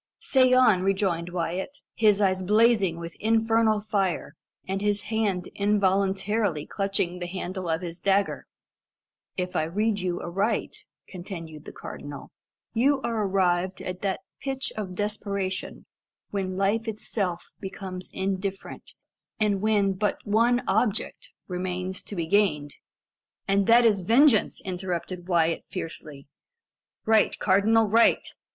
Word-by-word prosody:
"Say 255 -2 +3
on," 250 -7 +5
rejoined 190 -3 0
Wyat, 180 - -3 0.2
his 210 -3 +3
eyes 190 -2 +2
blazing 210 -3 +3
with 170 -1 -7
infernal 225 0 +2
fire, 200 -4 -1 0.3
and 195 +1 -2
his 205 0 +1
hand 200 -5 0
involuntarily 200 -3 +1
clutching 195 -3 -1
the 175 - -4
handle 185 0 -5
of 160 +1 0
his 170 -1 -6
dagger. 200 +2 +1 0.9
"If 180 -1 -3
I - - +2
read 205 +5 0
you 180 -2 -2
aright," 195 +6 -1 0.3
continued 170 -4 -8
the - - -8
cardinal, 145 -1 -9 0.4
"you 270 +4 +3
are 225 -2 -1
arrived 185 -1 +1
at 180 0 -6
that 195 -2 -1 0.2
pitch 270 -1 -3
of 190 -4 -5
desperation 200 -2 -3 0.5
when 185 -2 -2
life 210 +4 +1
itself 200 -5 -3
becomes 190 -1 -7
indifferent, 195 0 -4 0.4
and 205 -3 +1
when 205 -2 +2
but 205 +2 -1
one 235 +4 +3
object 215 +2 0 0.2
remains 185 0 -3
to 205 - -8
be 170 -3 -2
gained 160 -6 +2 0.4
" - - -60
"And 195 0 +2
that 235 +1 +6
is 205 -4 +3
vengeance!" 230 - +4
interrupted 180 -1 -4
Wyat 165 -2 +2
fiercely. 150 -3 -7 0.8
"Right, 220 -1 +3
cardinal 215 +3 +3
right. 230 +3 +4
195 Hz, 130 wpm, -26 LUFS, 180-215 Hz, 0.9 s, that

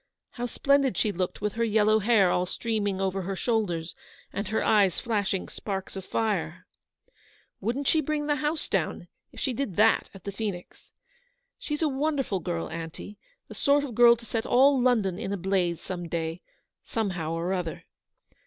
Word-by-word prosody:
How 245 0 -4
splendid 275 +1 +2
she 215 - +2
looked 180 -1 -3
with 210 -1 -1
her 230 - 0
yellow 215 -1 +3
hair 205 -4 +4
all 180 0 +1
streaming 205 -2 -1
over 195 0 -1
her 195 +2 -3
shoul 220 +2 +1
ders, 165 -1 -4 0.4
and 200 0 -3
her 220 +2 0
eyes 200 -5 +3
flashing 200 -5 -1
sparks 195 -2 -5
of 190 - -5
fire! 185 -5 -2 0.9
Wouldn't 245 +8 -2
she 320 - +4
bring 300 0 -1
the 295 0 +1
house 300 +1 -1
down, - - -2 0.2
if - - -11
she 260 - -1
did 230 -7 -3
that 220 +2 +4
at 195 - -12
the 200 - -4
Phoenix? 200 -3 -6 0.7
She's 300 +1 -3
a - - +4
wonderful 275 -7 0
girl, 170 -1 -3
aunty; 165 +5 -7 0.3
the - - -9
sort 285 0 +3
of 270 -4 -5
girl 235 +1 +7
to 235 0 -14
set 225 -1 -2
all 265 +1 +5
London 220 -8 +2
in 195 - -3
a 200 - -1
blaze 185 -2 0
some 175 -2 -5
day, 165 +1 -3 0.4
somehow 185 -8 -2
or 170 +3 -1
other. 175 -3 -4
205 Hz, 180 wpm, -27 LUFS, 185-240 Hz, 0.9 s, girl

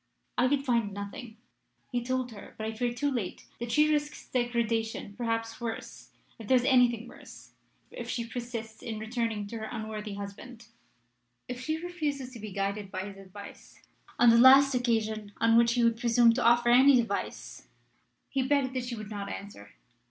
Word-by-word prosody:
I 250 - +3
could 280 +1 0
find 235 -5 +1
nothing. 220 +3 -7 0.5
He 245 -1 0
told 255 0 -2
her, 210 - -12
but 220 - -4
I 220 - -3
fear 240 +2 -1
too 285 +4 -1
late, 225 -9 -4
that 235 0 -4
she 300 +3 +4
risks 295 0 -3
degradation 230 -4 -1
perhaps 230 0 -3
worse, 230 -1 -6 0.3
if 220 - -9
there 260 - +5
is 245 - +1
anything 245 -3 +3
worse - - -14 0.4
if - - -7
she 235 - -2
persists 230 -2 -6
in 225 -2 -5
returning 220 -1 -2
to 225 +3 -6
her 220 0 -5
unworthy 215 -2 -5
husband. 220 +4 -9 0.8
If 250 0 -6
she 310 +4 -1
refuses 305 -6 -4
to 240 - -10
be 215 -1 -7
guided 200 +1 -2
by 185 -1 -4
his 195 0 -8
advice, 195 +1 -12 0.4
on 240 -1 +7
the 230 - +6
last 270 +2 +8
occasion 220 -4 -1
on 230 0 +3
which 235 0 +5
he 240 -1 +2
would 230 -1 +2
presume 235 -1 +5
to 245 - -1
offer 240 +1 +4
any 260 +3 +7
device, 235 -2 -2 0.6
he 270 - -1
begged 265 -1 +1
that 255 -1 -2
she 245 -1 -4
would 215 -1 -8
not 200 -1 -5
answer. 150 - -8
235 Hz, 180 wpm, -29 LUFS, 220-250 Hz, 0.8 s, last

